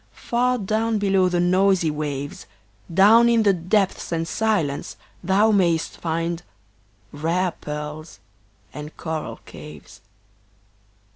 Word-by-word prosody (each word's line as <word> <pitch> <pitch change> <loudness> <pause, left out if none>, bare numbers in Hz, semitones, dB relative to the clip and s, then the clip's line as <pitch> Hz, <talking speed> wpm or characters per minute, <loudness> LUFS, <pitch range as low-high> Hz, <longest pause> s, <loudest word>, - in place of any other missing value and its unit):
far 250 +1 0
down 220 +1 0
below 195 -2 +2
the 175 -1 0
noisy 185 -1 +3
waves, 145 -4 -5 0.4
Down 215 +7 +6
in 230 -1 +3
the 200 -2 +4
depths 185 +3 0
and 165 -1 -1
silence 170 -10 -1 0.3
thou 200 +5 +3
mayst 170 -5 +1
find 165 +1 -2 0.7
Rare 170 +5 0
pearls 150 -4 -7 0.5
and 150 +1 -9
coral 160 -2 -5
caves. 75 -1 -12
175 Hz, 110 wpm, -23 LUFS, 155-205 Hz, 0.7 s, Down